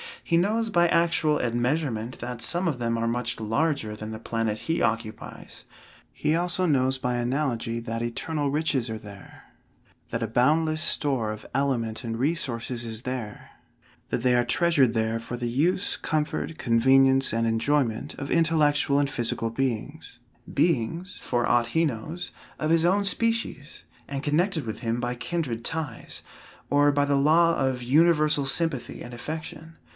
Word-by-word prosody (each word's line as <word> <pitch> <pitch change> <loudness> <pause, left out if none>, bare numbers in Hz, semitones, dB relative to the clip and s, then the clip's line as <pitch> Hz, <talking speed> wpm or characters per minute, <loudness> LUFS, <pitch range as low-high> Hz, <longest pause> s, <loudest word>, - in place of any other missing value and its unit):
He 170 - 0
knows 220 +5 +1
by 175 -2 +4
actual 165 -3 +2
admeasurement 120 0 -1
that 120 -1 -6
some 175 +9 -1
of 150 -6 -1
them 115 -1 0
are 115 0 -1
much 115 0 -2
larger 110 0 0
than 110 +1 -7
the 110 - -5
planet 115 -2 -2
he 165 +1 -1
occupies. 110 -1 -4 0.5
He 155 - 0
also 175 +2 +1
knows 130 -4 +2
by 125 -1 -1
analogy 120 -2 -1
that 115 0 -4
eternal 145 +5 -2
riches 140 -5 0
are 110 - -3
there; 100 -2 -13 0.7
that 115 0 -2
a - - -1
boundless 155 +7 +2
store 135 -9 +1
of 110 - -8
element 120 -5 -1
and 115 -1 -3
resources 125 -4 -1
is 110 -1 -5
there; 125 -4 -6 0.6
that 120 - -2
they 125 -1 +4
are 120 0 +3
treasured 150 -4 +3
there 110 0 0
for 115 +1 -6
the 120 -1 -2
use, 170 +10 +1
comfort, 155 +1 -2
convenience, 135 +3 +4
and 115 0 +1
enjoyment, 115 +1 0
of 140 0 -6
intellectual 150 -4 +3
and 140 -1 +1
physical 115 -3 0
beings 120 -3 -3 0.3
beings, 170 - 0
for 120 -1 0
aught 120 -1 +2
he 165 +7 +2
knows, 155 +7 -4 0.3
of 155 +1 -1
his 165 0 +4
own 195 +3 +3
species, 225 -8 -1 0.2
and 140 0 -4
connected 160 - +1
with 110 - -5
him 115 0 -1
by 120 0 -2
kindred 125 -3 -3
ties, 160 -7 -3 0.5
or 145 0 +5
by 145 0 +2
the 140 -1 +2
law 165 +4 +4
of 130 -2 -1
universal 150 +1 +4
sympathy 135 -1 -1
and 120 - -9
affection. 160 +4 -7
135 Hz, 160 wpm, -26 LUFS, 115-160 Hz, 0.7 s, or